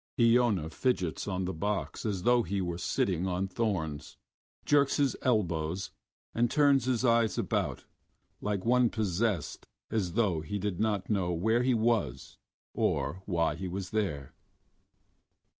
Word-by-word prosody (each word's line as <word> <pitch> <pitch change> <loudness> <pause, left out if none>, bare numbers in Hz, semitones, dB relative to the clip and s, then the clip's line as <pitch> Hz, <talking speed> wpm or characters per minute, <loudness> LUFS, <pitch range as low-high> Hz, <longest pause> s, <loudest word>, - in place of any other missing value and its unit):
Iona 115 -8 +3
fidgets 95 -6 -1
on 95 -2 -2
the 95 - -3
box 100 +5 -3
as 95 -4 -2
though 120 +2 +4
he 100 0 -2
were 85 -2 -3
sitting 90 0 0
on 95 +1 -1
thorns, 90 -8 -3 0.5
jerks 145 -1 +3
his 140 -3 +2
elbows, 90 -6 0 0.4
and 120 +1 +2
turns 140 -3 +4
his 125 -1 +1
eyes 115 -2 +3
about - - -1 0.6
like 105 -2 -2
one 125 0 +4
possessed 105 -4 -1 0.2
as 100 -6 -1
though 100 -8 +1
he 80 +7 -4
did 100 -3 -3
not 105 -2 0
know 95 -4 +1
where 110 +8 +2
he 125 0 +2
was 110 - -1 0.3
or 95 - -1
why 85 -5 +1
he 95 +4 -5
was 95 +1 -5
there. 90 -11 -2
100 Hz, 140 wpm, -30 LUFS, 90-115 Hz, 0.6 s, though